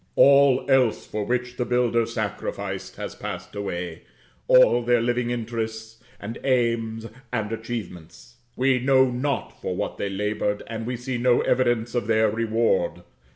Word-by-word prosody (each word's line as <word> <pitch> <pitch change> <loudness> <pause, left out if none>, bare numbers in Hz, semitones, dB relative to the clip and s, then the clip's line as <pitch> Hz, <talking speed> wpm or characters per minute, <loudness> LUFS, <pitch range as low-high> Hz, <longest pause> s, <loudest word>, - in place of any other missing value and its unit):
All 140 -1 +6
else 130 -4 +3
for 105 -1 -4
which 125 +1 -2
the 125 - 0
builders 120 -2 +1
sacrificed, - - -4
has - - -6
passed 90 -2 -7
away 90 -4 -4 0.5
all 120 -1 +6
their 120 0 +3
living 120 +1 0
interests, 110 -1 -4 0.2
and 110 +3 -7
aims, 115 -3 0 0.3
and 110 -3 -2
achievements. 115 -2 -7 0.2
We 130 0 +2
know 130 0 +4
not 135 +3 -3
for - - -3
what - - -3
they 100 - -2
labored, 105 +1 -2
and 115 0 -5
we 125 0 -2
see 125 0 -4
no 120 0 +3
evidence 120 -2 +1
of 120 -4 -1
their 110 -1 +3
reward. 115 -1 0
115 Hz, 150 wpm, -24 LUFS, 110-125 Hz, 0.5 s, All